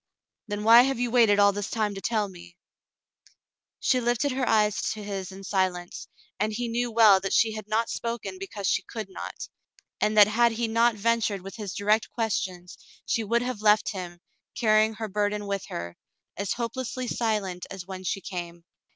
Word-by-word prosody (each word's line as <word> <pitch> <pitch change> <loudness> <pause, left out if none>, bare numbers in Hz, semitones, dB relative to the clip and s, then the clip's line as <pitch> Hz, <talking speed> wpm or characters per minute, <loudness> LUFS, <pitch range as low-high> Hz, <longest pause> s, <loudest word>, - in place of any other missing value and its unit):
"Then 205 0 -4
why 230 +2 +9
have 270 0 +1
you 245 -1 -1
waited 230 -4 +5
all 200 0 +6
this 205 +1 -4
time 215 -2 -1
to 195 - -7
tell 215 -2 0
me? 175 -2 -14 0.6
" - - -27 0.5
She 255 - +2
lifted 240 +3 0
her 255 -2 -1
eyes 210 -2 +2
to 215 -1 -8
his 195 -2 -5
in 195 +1 -10
silence, 185 -3 -2 0.3
and 215 +2 0
he 240 +3 -3
knew 240 +1 -1
well 220 -4 +6
that 195 0 -3
she 225 - +4
had 215 -1 -7
not 225 +2 +1
spoken 235 +10 -4
because 220 - -6
she - - +2
could 220 -4 -7
not, - - -7 0.5
and 215 0 +1
that 210 - +10
had 230 +3 +2
he 230 +1 -1
not 230 +1 +3
ventured 215 -2 0
with 195 +2 -9
his 205 -4 -6
direct 210 +2 +1
questions, 185 -6 -3 0.3
she 230 - 0
would 235 +3 +1
have 250 -4 -4
left 210 0 +4
him, 180 -3 -7 0.4
carrying 215 -1 +3
her 220 0 -4
burden 205 +1 -1
with 200 -1 -3
her, 85 0 -6 0.4
as 200 0 -2
hopelessly 245 +1 -4
silent 210 -7 -2
as 190 -2 -7
when 190 0 -8
she 195 +1 -2
came. 175 -3 -7
215 Hz, 190 wpm, -26 LUFS, 195-230 Hz, 0.6 s, that